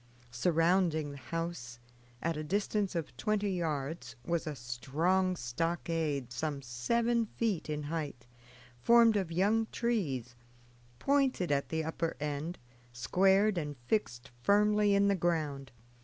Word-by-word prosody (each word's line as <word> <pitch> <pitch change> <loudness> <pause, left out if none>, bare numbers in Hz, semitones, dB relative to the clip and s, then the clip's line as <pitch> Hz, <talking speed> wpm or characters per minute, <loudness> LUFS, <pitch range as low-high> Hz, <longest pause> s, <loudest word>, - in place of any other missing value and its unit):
Surrounding 165 +2 +2
the 140 - -9
house, 135 -4 -5 0.5
at 165 0 0
a 155 - -4
distance 200 +3 -1
of 165 -2 -3
twenty 210 -1 0
yards, 160 -3 -3
was 170 -1 -1
a 150 - -3
strong 160 +10 0
stockade 155 -1 -2
some 145 +3 -2
seven 230 - 0
feet 210 -8 -2
in 150 0 -2
height, 145 -5 -4 0.5
formed 230 - +6
of 190 -5 -1
young 210 +6 +2
trees, 150 - -1 0.6
pointed 270 - +1
at 140 -1 0
the 160 0 -1
upper 160 +1 -2
end, 150 +3 -3 0.3
squared, 190 - +3
and 145 -3 -5
fixed 120 - -1
firmly 210 +4 +4
in 200 0 +4
the 200 - +4
ground. 155 -6 -1
165 Hz, 125 wpm, -32 LUFS, 145-200 Hz, 0.6 s, formed